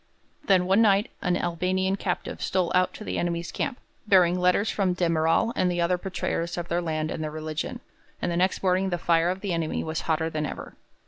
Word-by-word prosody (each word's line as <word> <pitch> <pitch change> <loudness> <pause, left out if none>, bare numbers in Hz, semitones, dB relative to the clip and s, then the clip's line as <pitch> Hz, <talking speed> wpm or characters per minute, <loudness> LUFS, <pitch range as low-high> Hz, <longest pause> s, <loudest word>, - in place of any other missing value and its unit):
Then 185 -2 +4
one 190 +4 +4
night 205 -1 +3
an 180 -1 +1
Albanian 185 +3 0
captive 190 -2 -3
stole 185 -2 0
out 185 0 +3
to - - -8
the - - -3
enemy's 170 0 -2
camp, 275 -3 -2 0.3
bearing 180 -3 +5
letters 180 +4 +2
from 190 -3 +1
de 180 -1 0
Merall 165 +7 +2
and 180 - +2
the 175 0 -1
other 175 +1 +1
betrayers 175 -2 -3
of 175 0 -4
their 175 +1 0
land 155 -2 -2
and 155 - -3
their 155 - -2
religion, 155 0 -4 0.4
and - - -1
the - - -1
next 185 +2 +1
morning 185 +1 +2
the 175 - -1
fire 165 0 +2
of 185 +1 -3
the 195 -3 -2
enemy 165 -2 -1
was 160 0 -3
hotter 160 0 0
than 155 -1 -2
ever. - - -7
175 Hz, 215 wpm, -26 LUFS, 165-190 Hz, 0.4 s, bearing